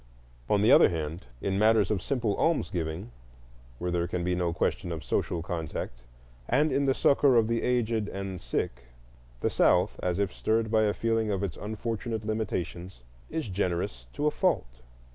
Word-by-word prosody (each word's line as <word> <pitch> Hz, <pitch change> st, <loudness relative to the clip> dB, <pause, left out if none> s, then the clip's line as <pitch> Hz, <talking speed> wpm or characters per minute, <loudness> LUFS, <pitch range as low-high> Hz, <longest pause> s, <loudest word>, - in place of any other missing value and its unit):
On 105 Hz, 0 st, +3 dB
the 110 Hz, -, +5 dB
other -, -, +8 dB
hand, 80 Hz, -3 st, -4 dB
in 95 Hz, 0 st, 0 dB
matters 110 Hz, -2 st, +4 dB
of 100 Hz, -4 st, 0 dB
simple 120 Hz, -5 st, 0 dB
almsgiving, 85 Hz, -, -1 dB, 0.7 s
where 90 Hz, +5 st, -2 dB
there 85 Hz, 0 st, 0 dB
can 90 Hz, 0 st, -2 dB
be 90 Hz, +1 st, 0 dB
no 90 Hz, -1 st, 0 dB
question 85 Hz, +1 st, -1 dB
of 80 Hz, -2 st, -4 dB
social 85 Hz, -2 st, -1 dB
contact, 80 Hz, -8 st, -5 dB, 0.4 s
and 155 Hz, +1 st, +3 dB
in 140 Hz, -, +2 dB
the 135 Hz, -1 st, +2 dB
succor 140 Hz, -2 st, +4 dB
of 115 Hz, -2 st, +4 dB
the 115 Hz, 0 st, 0 dB
aged 115 Hz, -3 st, +1 dB
and 95 Hz, -3 st, -5 dB
sick, -, -, -3 dB, 0.6 s
the -, -, +2 dB
South, -, -, +3 dB
as 90 Hz, -1 st, 0 dB
if 100 Hz, -1 st, 0 dB
stirred 110 Hz, 0 st, 0 dB
by 110 Hz, -1 st, +4 dB
a 105 Hz, -, +2 dB
feeling 115 Hz, -1 st, 0 dB
of 100 Hz, -1 st, -1 dB
its 95 Hz, -5 st, -3 dB
unfortunate 110 Hz, +1 st, -4 dB
limitations, 95 Hz, -, -3 dB, 0.3 s
is 160 Hz, -5 st, -3 dB
generous 85 Hz, -10 st, -2 dB
to 145 Hz, -, -2 dB
a 150 Hz, -, +4 dB
fault. 65 Hz, -, 0 dB
100 Hz, 175 wpm, -28 LUFS, 85-115 Hz, 0.7 s, other